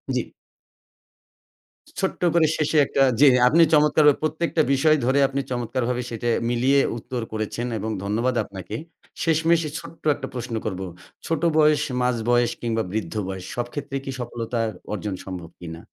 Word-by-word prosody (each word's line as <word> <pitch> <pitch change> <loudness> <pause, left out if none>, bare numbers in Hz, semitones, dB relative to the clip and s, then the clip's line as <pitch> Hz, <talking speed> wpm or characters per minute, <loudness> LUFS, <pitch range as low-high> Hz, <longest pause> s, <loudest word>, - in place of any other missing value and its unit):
জ্বী। - - +1 1.8
ছোট্ট 190 -2 -2
করে 165 -2 +4
শেষে 155 0 +1
একটা 140 - 0 0.2
যে, 145 - +8 0.2
আপনি 160 +6 +5
চমৎকারভাবে 150 -1 +5
প্রত্যেকটা 160 +1 0
বিষয় 155 +3 +4
ধরে 135 +2 +3
আপনি 135 +1 -2
চমৎকারভাবে 125 0 -1
সেটা 120 0 -4 0.2
মিলিয়ে 130 +4 +3 0.2
উত্তর 120 +1 -5
করেছেন, 110 +3 -3
এবং 110 +2 -3
ধন্যবাদ 115 +5 0
আপনাকে। 95 0 -8 0.5
শেষমেষে 165 0 +2
ছোট্ট 165 - -13
একটা - - -6
প্রশ্ন 120 -2 -4
করব। 95 -3 -3 0.5
ছোট 165 -2 -1 0.2
বয়স, 150 -1 +4 0.2
মাঝ 125 -1 +2
বয়স 120 0 +3
কিংবা 115 -1 -1
বৃদ্ধ 100 -5 -3
বয়স 95 -1 -6
সব 120 0 -1
ক্ষেত্রেই 140 -1 -4
কি 135 - -3
সফলতা 120 -1 -4 0.3
অর্জন 100 -1 -3
সম্ভব 90 -3 -7
কিনা? 85 -1 -8
125 Hz, 145 wpm, -23 LUFS, 110-150 Hz, 1.8 s, যে